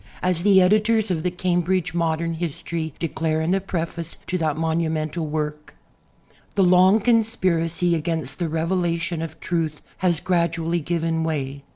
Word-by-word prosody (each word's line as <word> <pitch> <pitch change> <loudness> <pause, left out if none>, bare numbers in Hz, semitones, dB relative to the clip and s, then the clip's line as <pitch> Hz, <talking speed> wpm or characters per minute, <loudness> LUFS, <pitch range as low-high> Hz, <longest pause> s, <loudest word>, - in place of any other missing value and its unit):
As 180 -2 +1
the 195 0 +6
editors 215 +2 +3
of 165 -3 0
the 180 - 0
"Cambridge 180 0 0
Modern 165 0 0
History" 160 -1 -4
declare 160 -1 -1
in 160 +2 0
the 195 +1 +2
preface 170 -2 -4
to 185 - -3
that 155 -2 0
monumental 160 0 -1
work: 150 0 -4 0.8
The 195 - +4
long 185 +3 +6
conspiracy 185 -7 +2
against 160 -3 -2
the 170 -2 -1
revelation 165 0 -1
of 165 - -6
truth 160 -3 -2 0.2
has 175 -4 +1
gradually 170 -1 0
given 165 0 -1
way. 140 -3 -3
170 Hz, 145 wpm, -23 LUFS, 160-180 Hz, 0.8 s, the